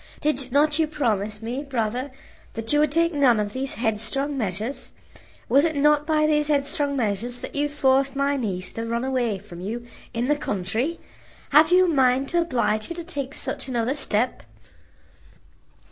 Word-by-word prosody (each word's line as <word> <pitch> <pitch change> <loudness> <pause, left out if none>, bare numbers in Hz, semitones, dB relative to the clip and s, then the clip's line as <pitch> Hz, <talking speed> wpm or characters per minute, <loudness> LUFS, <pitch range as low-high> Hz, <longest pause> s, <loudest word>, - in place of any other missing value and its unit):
Did 275 -4 -1
not 295 +3 +3
you 320 - +3
promise 215 -8 -1
me, 245 +4 -3
brother, 250 -1 -2 0.5
that 225 +4 -1
you 295 - +4
would 300 -1 +3
take 335 +2 +2
none 265 -6 +4
of 205 0 -2
these 265 +1 -2
headstrong 240 +6 -1
measures? 220 +2 -3 0.6
Was 275 +4 +4
it 320 -2 0
not 295 +1 +3
by 305 -1 +3
these 300 -1 +2
headstrong 285 0 0
measures 230 +1 -1
that - - -7
you 290 +1 0
forced 270 -1 +2
my 280 +1 +1
niece 190 -8 -3
to 225 - -4
run 235 +1 -1
away 245 -6 0
from 180 -3 -11
you 230 +5 -5 0.3
in 240 +1 -2
the 295 - +3
country? 225 - -2 0.5
Have 310 +3 +6
you 370 +1 +6
a - - 0
mind 265 -3 +2
to 345 - +2
oblige 235 -8 0
her 340 - -5
to 340 - -5
take 285 -5 -5
such - - -3
another 245 0 0
step?" 245 - 0
265 Hz, 175 wpm, -24 LUFS, 225-295 Hz, 0.6 s, Have